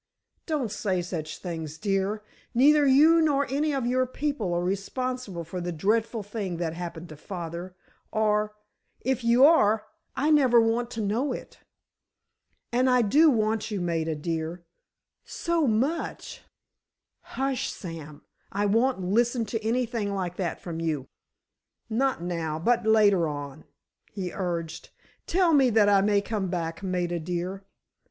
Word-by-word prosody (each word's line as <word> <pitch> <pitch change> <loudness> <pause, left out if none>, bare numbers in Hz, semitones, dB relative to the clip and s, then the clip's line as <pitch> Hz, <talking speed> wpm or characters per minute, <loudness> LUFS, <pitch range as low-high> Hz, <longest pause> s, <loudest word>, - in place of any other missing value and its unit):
"Don't 290 - -1
say 190 -4 -1
such 160 -3 -5
things, 160 -4 -6
dear. 200 +3 -1 0.3
Neither 290 +3 +5
you 310 +5 +6
nor 285 -3 +2
any 295 +3 +1
of 270 -4 -1
your 255 +1 +1
people 255 -7 -2
are 175 0 0
responsible 200 +1 -3
for 180 +3 -6
the 175 0 -3
dreadful 215 +6 0
thing 200 -4 -4
that 165 -2 -2
happened 170 0 -6
to 155 - -9
father—or, 185 +5 -3 0.5
if 260 -1 -1
you 235 +3 +6
are, 220 -9 +4 0.3
I 300 +3 +1
never 260 -6 +5
want 230 +1 +1
to 225 - -3
know 220 +7 0
it. - - -9 1.1
And 250 +2 +2
I 250 -1 +4
do 300 +10 +5
want 220 -4 0
you, 210 -3 -2
Maida 165 -2 -1
dear—so 170 - -4
much——" 255 +9 -1 0.8
"Hush, 270 -1 -2
Sam; 160 -5 -9 0.3
I 205 +1 0
won't 230 +2 +2
listen 230 +5 +1
to 220 +1 -4
anything 230 -3 -1
like 180 -2 -3
that 175 -4 -2
from 165 -2 -6
you." 150 -5 -2 0.8
"Not 255 -5 0
now, 165 -3 -2
but 230 +6 +1
later 205 -6 +4
on," 145 0 -6 0.5
he 185 -3 -4
urged. 170 -4 -4 0.4
"Tell 355 -2 +3
me 270 -4 +5
that 215 -2 +4
I 200 -1 +5
may 205 0 +3
come 200 -2 -2
back, 165 -2 -3
Maida 180 -2 -1
dear." 180 +4 -4
205 Hz, 140 wpm, -27 LUFS, 175-245 Hz, 1.1 s, you